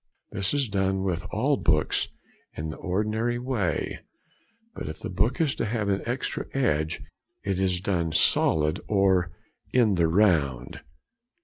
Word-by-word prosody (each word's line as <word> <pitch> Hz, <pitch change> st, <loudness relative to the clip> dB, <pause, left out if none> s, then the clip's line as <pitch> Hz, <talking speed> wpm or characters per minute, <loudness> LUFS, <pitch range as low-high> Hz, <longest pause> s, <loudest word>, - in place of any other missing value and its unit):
This 95 Hz, 0 st, -1 dB
is 140 Hz, -3 st, +1 dB
done 95 Hz, -2 st, 0 dB
with 90 Hz, -1 st, -1 dB
all 135 Hz, +6 st, +1 dB
books 75 Hz, 0 st, +1 dB, 0.5 s
in 75 Hz, +1 st, -3 dB
the -, -, -8 dB
ordinary 110 Hz, +5 st, -1 dB
way, 120 Hz, -7 st, -1 dB, 0.7 s
but -, -, -6 dB
if 75 Hz, -, -6 dB
the -, -, -5 dB
book 105 Hz, -, +1 dB
is 155 Hz, -4 st, +2 dB
to -, -, -2 dB
have 105 Hz, -2 st, -1 dB
an 100 Hz, 0 st, +1 dB
extra 125 Hz, +2 st, -2 dB
edge, 80 Hz, -, 0 dB, 0.4 s
it 95 Hz, -2 st, -1 dB
is 90 Hz, -2 st, +1 dB
done 85 Hz, -5 st, 0 dB
"solid" 80 Hz, -1 st, +3 dB
or 95 Hz, -3 st, +3 dB, 0.4 s
"in 115 Hz, -5 st, +4 dB
the 85 Hz, -3 st, +3 dB
round." 80 Hz, -, +2 dB
95 Hz, 145 wpm, -26 LUFS, 85-110 Hz, 0.7 s, in